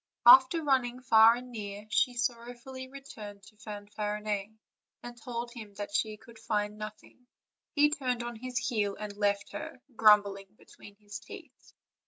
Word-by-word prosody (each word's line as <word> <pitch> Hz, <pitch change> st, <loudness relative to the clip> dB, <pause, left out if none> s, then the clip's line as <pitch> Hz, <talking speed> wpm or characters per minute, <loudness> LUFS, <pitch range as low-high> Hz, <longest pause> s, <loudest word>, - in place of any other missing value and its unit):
After 265 Hz, +6 st, +8 dB
running 255 Hz, -3 st, +1 dB
far 225 Hz, -1 st, +7 dB
and 250 Hz, +1 st, -9 dB
near 205 Hz, -2 st, -7 dB
she 245 Hz, +3 st, +2 dB
sorrowfully 245 Hz, +2 st, -4 dB
returned 220 Hz, -7 st, -10 dB
to 210 Hz, +1 st, -18 dB
Fanfarinet, 210 Hz, -1 st, -4 dB, 0.5 s
and 240 Hz, 0 st, -8 dB
told 235 Hz, 0 st, -6 dB
him 215 Hz, -4 st, -10 dB
that 205 Hz, 0 st, -6 dB
she 215 Hz, +1 st, 0 dB
could 230 Hz, +1 st, -16 dB
find 210 Hz, -1 st, -1 dB
nothing; 215 Hz, +3 st, -10 dB, 0.5 s
he 295 Hz, 0 st, +5 dB
turned 255 Hz, -5 st, -1 dB
on 240 Hz, 0 st, -5 dB
his 250 Hz, +1 st, -5 dB
heel 205 Hz, -6 st, 0 dB
and 210 Hz, -1 st, -6 dB
left 205 Hz, -1 st, 0 dB
her, 315 Hz, -3 st, -7 dB, 0.2 s
grumbling 205 Hz, -3 st, +4 dB
between 205 Hz, -, -16 dB
his 205 Hz, 0 st, -9 dB
teeth. -, -, -13 dB
220 Hz, 150 wpm, -30 LUFS, 210-250 Hz, 0.5 s, After